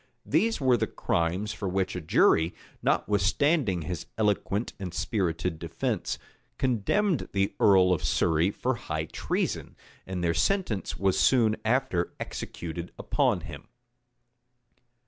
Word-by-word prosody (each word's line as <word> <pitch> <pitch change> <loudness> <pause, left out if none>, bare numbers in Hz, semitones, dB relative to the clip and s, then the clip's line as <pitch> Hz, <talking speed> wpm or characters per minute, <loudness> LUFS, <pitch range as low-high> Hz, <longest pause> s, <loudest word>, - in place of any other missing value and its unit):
These 225 0 +2
were 130 -3 +4
the 110 -1 0
crimes 90 +6 -1
for 100 - -3
which 95 0 -1
a 90 - -3
jury, 80 +1 +3 0.3
notwithstanding 105 - +2
his 85 -1 -5
eloquent 105 0 0
and 95 -3 -5
spirited 90 -6 -1
defence, 85 +7 -2 0.4
condemned 135 - +1
the 100 0 +1
earl 95 -2 +5
of 85 - -2
Surrey 80 +2 +2
for 125 +5 -1
high 80 -9 -3
treason; - - -2 0.3
and 90 -2 -3
their 85 -1 +2
sentence 180 - 0
was 95 -1 +1
soon 115 -4 +4
after 110 -7 0
executed 85 +1 -6
upon - - +1
him. - - -9
95 Hz, 125 wpm, -28 LUFS, 85-115 Hz, 0.4 s, earl